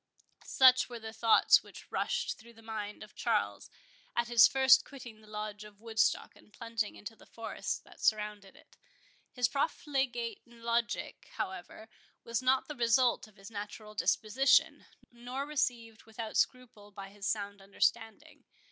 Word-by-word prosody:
Such 255 Hz, -1 st, +5 dB
were 240 Hz, -, -6 dB
the 220 Hz, -1 st, -8 dB
thoughts 225 Hz, 0 st, +5 dB
which -, -, -14 dB
rushed 485 Hz, 0 st, -1 dB
through 235 Hz, +1 st, -15 dB
the 225 Hz, 0 st, -18 dB
mind 215 Hz, -2 st, -6 dB
of 210 Hz, -, -14 dB
Charles, 100 Hz, 0 st, -1 dB, 0.5 s
at 235 Hz, 0 st, 0 dB
his 235 Hz, -3 st, +8 dB
first 265 Hz, 0 st, +5 dB
quitting 240 Hz, -6 st, -11 dB
the 215 Hz, -, -18 dB
Lodge 210 Hz, 0 st, -6 dB
of 210 Hz, -1 st, -14 dB
Woodstock, 225 Hz, 0 st, 0 dB
and -, -, -21 dB
plunging 230 Hz, -2 st, -3 dB
into 225 Hz, +2 st, -9 dB
the -, -, -19 dB
forest 230 Hz, -, -5 dB
that -, -, -17 dB
surrounded 210 Hz, -2 st, -1 dB
it. -, -, -21 dB, 0.5 s
His 250 Hz, -2 st, +1 dB
profligate 265 Hz, -5 st, -2 dB
logic, 235 Hz, 0 st, -3 dB
however, 190 Hz, +4 st, -6 dB, 0.4 s
was 230 Hz, 0 st, -2 dB
not 255 Hz, +1 st, +2 dB
the 300 Hz, -, -5 dB
result 240 Hz, -1 st, +2 dB
of 215 Hz, -, -22 dB
his 195 Hz, +1 st, -13 dB
natural 210 Hz, 0 st, -7 dB
disposition, 225 Hz, +5 st, +2 dB, 0.2 s
nor 245 Hz, +3 st, -5 dB
received 235 Hz, -6 st, -2 dB
without 220 Hz, 0 st, -7 dB
scruple 245 Hz, -6 st, -1 dB
by 195 Hz, -1 st, -9 dB
his 200 Hz, -1 st, -6 dB
sound 200 Hz, -2 st, -2 dB
understanding. 210 Hz, +3 st, -2 dB
225 Hz, 150 wpm, -32 LUFS, 210-245 Hz, 0.5 s, his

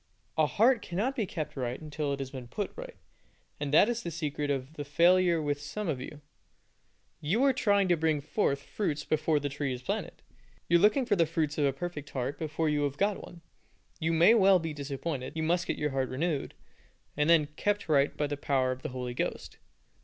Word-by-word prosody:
A 155 Hz, -1 st, +3 dB
heart 230 Hz, -, +3 dB
cannot 210 Hz, +11 st, -2 dB
be 220 Hz, -6 st, -1 dB
kept 155 Hz, -4 st, -5 dB
right 125 Hz, -2 st, -3 dB
until 150 Hz, -1 st, -3 dB
it 140 Hz, -, -1 dB
has 135 Hz, -1 st, -5 dB
been 130 Hz, -3 st, -8 dB
put 200 Hz, -, -4 dB
right, -, -, -8 dB, 0.6 s
and 145 Hz, -1 st, -3 dB
that 160 Hz, +7 st, +6 dB
is 235 Hz, -1 st, -1 dB
the 170 Hz, -, -4 dB
secret 150 Hz, -3 st, -3 dB
of 135 Hz, +1 st, -2 dB
the 150 Hz, -, -5 dB
failure 170 Hz, +3 st, +4 dB
with 145 Hz, -1 st, -2 dB
some 205 Hz, +8 st, -5 dB
of 140 Hz, -6 st, -2 dB
you. 150 Hz, +3 st, -9 dB, 1.0 s
You 195 Hz, -, +1 dB
are 275 Hz, -1 st, +5 dB
trying 200 Hz, -6 st, +2 dB
to 175 Hz, -, +5 dB
bring 160 Hz, -2 st, +1 dB
forth 140 Hz, -2 st, -1 dB
fruits 150 Hz, -7 st, -3 dB
before 155 Hz, 0 st, +1 dB
the 145 Hz, -, -2 dB
tree 140 Hz, -1 st, -3 dB
is 125 Hz, 0 st, -5 dB
planted. -, -, -4 dB, 0.4 s
You 170 Hz, -, +5 dB
are -, -, 0 dB
looking 215 Hz, +6 st, +4 dB
for 220 Hz, -4 st, +2 dB
the 165 Hz, -3 st, +3 dB
fruits 155 Hz, -2 st, -1 dB
of 145 Hz, -, +3 dB
a 140 Hz, -, +3 dB
perfect 150 Hz, 0 st, -6 dB
heart 135 Hz, +2 st, -3 dB
before 160 Hz, 0 st, -1 dB
you 150 Hz, -1 st, +1 dB
have 140 Hz, 0 st, -3 dB
got 200 Hz, 0 st, 0 dB
one. 175 Hz, -1 st, -12 dB, 0.6 s
You 160 Hz, 0 st, 0 dB
may 170 Hz, +7 st, +6 dB
well 195 Hz, -4 st, +6 dB
be 165 Hz, -3 st, -4 dB
disappointed. 140 Hz, -1 st, -4 dB
You 160 Hz, -, -1 dB
must 175 Hz, +2 st, +1 dB
get -, -, -1 dB
your 150 Hz, -1 st, -1 dB
heart 135 Hz, -1 st, -1 dB
renewed, 150 Hz, +2 st, -2 dB, 0.6 s
and 150 Hz, +2 st, +1 dB
then 155 Hz, -3 st, +5 dB
kept 205 Hz, +2 st, -1 dB
right 145 Hz, -2 st, +2 dB
by 150 Hz, -, +1 dB
the 145 Hz, 0 st, -3 dB
power 135 Hz, -2 st, +1 dB
of 130 Hz, 0 st, -5 dB
the 155 Hz, -, -4 dB
Holy 125 Hz, -1 st, -5 dB
Ghost. -, -, -4 dB
155 Hz, 220 wpm, -29 LUFS, 140-175 Hz, 1.0 s, that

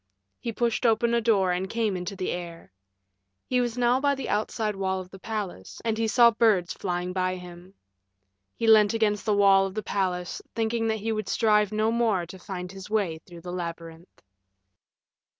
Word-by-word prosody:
He 235 Hz, -, -3 dB
pushed 235 Hz, +1 st, -1 dB
open 235 Hz, 0 st, +3 dB
a 235 Hz, -, +2 dB
door 200 Hz, -5 st, +3 dB
and 185 Hz, +2 st, -2 dB
came 225 Hz, -4 st, 0 dB
into 180 Hz, +2 st, -4 dB
the 185 Hz, -, -2 dB
air. 170 Hz, -, -7 dB, 0.7 s
He 250 Hz, -1 st, +1 dB
was 240 Hz, -1 st, -2 dB
now 245 Hz, +1 st, +3 dB
by 280 Hz, 0 st, +2 dB
the 270 Hz, -, -5 dB
outside 215 Hz, 0 st, -1 dB
wall 190 Hz, -1 st, -1 dB
of 185 Hz, 0 st, -9 dB
the 195 Hz, -, -11 dB
palace, 200 Hz, -, -5 dB
and 225 Hz, -1 st, +1 dB
he 225 Hz, 0 st, 0 dB
saw 235 Hz, +1 st, +6 dB
birds 215 Hz, -6 st, +2 dB
flying 180 Hz, -1 st, -3 dB
by 185 Hz, 0 st, 0 dB
him. 180 Hz, +1 st, -11 dB, 0.8 s
He 230 Hz, -, -2 dB
leant 220 Hz, -1 st, +6 dB
against 210 Hz, -2 st, 0 dB
the 210 Hz, -, +3 dB
wall 195 Hz, -1 st, +5 dB
of 190 Hz, -, -10 dB
the 215 Hz, -, -3 dB
palace, 180 Hz, -3 st, -2 dB
thinking 225 Hz, 0 st, 0 dB
that 220 Hz, -1 st, -1 dB
he 225 Hz, +2 st, -1 dB
would 215 Hz, -2 st, -3 dB
strive 210 Hz, -2 st, +3 dB
no 215 Hz, +1 st, +1 dB
more 225 Hz, -6 st, +1 dB
to 185 Hz, +3 st, -11 dB
find 180 Hz, -2 st, -6 dB
his 195 Hz, 0 st, -10 dB
way 195 Hz, -7 st, 0 dB
through 170 Hz, -2 st, -11 dB
the 175 Hz, +1 st, -7 dB
labyrinth. 165 Hz, -1 st, -7 dB
205 Hz, 190 wpm, -26 LUFS, 180-225 Hz, 0.8 s, saw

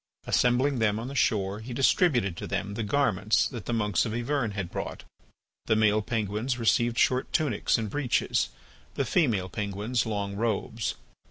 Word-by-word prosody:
Assembling 125 Hz, +2 st, +2 dB
them 105 Hz, -2 st, +2 dB
on 115 Hz, +3 st, -5 dB
the -, -, -7 dB
shore, 105 Hz, -6 st, +1 dB
he 120 Hz, +2 st, -7 dB
distributed 125 Hz, -, +3 dB
to -, -, -6 dB
them 100 Hz, 0 st, -3 dB
the 115 Hz, -, -3 dB
garments 110 Hz, -3 st, +2 dB
that 120 Hz, -6 st, -8 dB
the -, -, -1 dB
monks 105 Hz, -5 st, +1 dB
of 115 Hz, -2 st, -3 dB
Yvern 120 Hz, -2 st, -1 dB
had 95 Hz, -4 st, -4 dB
brought. -, -, -5 dB, 0.6 s
The 110 Hz, -, +3 dB
male 110 Hz, 0 st, +3 dB
penguins 110 Hz, +3 st, -2 dB
received 120 Hz, 0 st, +2 dB
short 130 Hz, 0 st, +2 dB
tunics 145 Hz, -10 st, +1 dB
and 110 Hz, -1 st, -2 dB
breeches, 130 Hz, +2 st, 0 dB, 0.5 s
the -, -, 0 dB
female 115 Hz, -, +1 dB
penguins 105 Hz, +5 st, -2 dB
long 100 Hz, -2 st, -2 dB
robes. 110 Hz, +1 st, -1 dB
110 Hz, 165 wpm, -27 LUFS, 105-125 Hz, 0.6 s, distributed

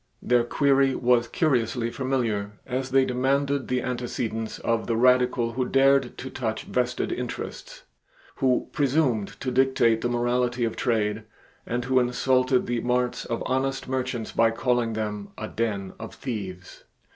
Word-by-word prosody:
Their 120 Hz, -1 st, +2 dB
query 135 Hz, +1 st, +2 dB
was 120 Hz, -1 st, +3 dB
curiously 120 Hz, -5 st, 0 dB
familiar, 115 Hz, -7 st, -1 dB
as 130 Hz, +1 st, -3 dB
they 135 Hz, 0 st, +4 dB
demanded 135 Hz, +2 st, 0 dB
the 125 Hz, -1 st, 0 dB
antecedents 120 Hz, -3 st, -3 dB
of 115 Hz, -1 st, -1 dB
the 115 Hz, -, 0 dB
Radical 125 Hz, -1 st, +3 dB
who 125 Hz, +2 st, -1 dB
dared 135 Hz, 0 st, +3 dB
to 130 Hz, -, -7 dB
touch 110 Hz, -4 st, -3 dB
vested 125 Hz, 0 st, -1 dB
interests, 125 Hz, -1 st, -6 dB, 0.5 s
who 130 Hz, -2 st, +1 dB
presumed 135 Hz, -7 st, 0 dB
to 130 Hz, -, -2 dB
dictate 125 Hz, -3 st, +3 dB
the 120 Hz, -, 0 dB
morality 120 Hz, 0 st, 0 dB
of 115 Hz, -, -1 dB
trade, 110 Hz, -3 st, 0 dB, 0.4 s
and 120 Hz, +1 st, -2 dB
who 130 Hz, 0 st, +3 dB
insulted 130 Hz, +1 st, +2 dB
the 120 Hz, -1 st, -1 dB
marts 125 Hz, 0 st, 0 dB
of 115 Hz, -, -3 dB
honest 135 Hz, +1 st, -1 dB
merchants 130 Hz, -3 st, -2 dB
by 115 Hz, 0 st, +3 dB
calling 120 Hz, 0 st, 0 dB
them 105 Hz, -2 st, -4 dB
"a 110 Hz, -, -4 dB
den 100 Hz, -5 st, -2 dB
of 110 Hz, -, -8 dB
thieves." 95 Hz, -7 st, -6 dB
125 Hz, 145 wpm, -25 LUFS, 115-130 Hz, 0.5 s, they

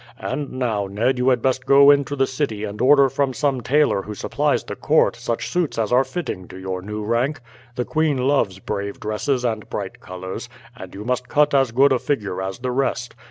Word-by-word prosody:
And 140 Hz, +2 st, -4 dB
now, 115 Hz, -6 st, -1 dB
Ned, 115 Hz, +6 st, 0 dB
you 125 Hz, +1 st, +3 dB
had 125 Hz, -3 st, +1 dB
best 130 Hz, -1 st, 0 dB
go 140 Hz, +1 st, +8 dB
into 140 Hz, 0 st, +1 dB
the 135 Hz, -1 st, +2 dB
city 130 Hz, -6 st, -3 dB
and 105 Hz, +1 st, -5 dB
order 140 Hz, +1 st, +6 dB
from 135 Hz, 0 st, -1 dB
some 140 Hz, -4 st, 0 dB
tailor 145 Hz, -5 st, +2 dB
who 105 Hz, +1 st, -7 dB
supplies -, -, 0 dB
the -, -, -6 dB
court -, -, +2 dB
such 115 Hz, -, -3 dB
suits 175 Hz, -8 st, -1 dB
as 110 Hz, -1 st, -1 dB
are 125 Hz, +2 st, +5 dB
fitting 115 Hz, -, -5 dB
to -, -, -11 dB
your 95 Hz, -1 st, -4 dB
new 105 Hz, +2 st, -5 dB
rank. 120 Hz, +8 st, 0 dB, 0.4 s
The 125 Hz, -, -2 dB
queen 155 Hz, -3 st, +1 dB
loves 125 Hz, -7 st, +1 dB
brave 100 Hz, +1 st, -4 dB
dresses 110 Hz, +5 st, -1 dB
and 110 Hz, -3 st, -2 dB
bright 100 Hz, -2 st, -5 dB
colours, 95 Hz, +5 st, -7 dB, 0.3 s
and 95 Hz, -7 st, -10 dB
you 105 Hz, +2 st, -7 dB
must 125 Hz, 0 st, -1 dB
cut 150 Hz, 0 st, +3 dB
as 135 Hz, -4 st, +3 dB
good 135 Hz, +3 st, +4 dB
a 130 Hz, -, +1 dB
figure 105 Hz, -10 st, -2 dB
as 95 Hz, 0 st, -4 dB
the 125 Hz, +1 st, -3 dB
rest. 125 Hz, -2 st, -1 dB
125 Hz, 210 wpm, -22 LUFS, 105-135 Hz, 0.4 s, go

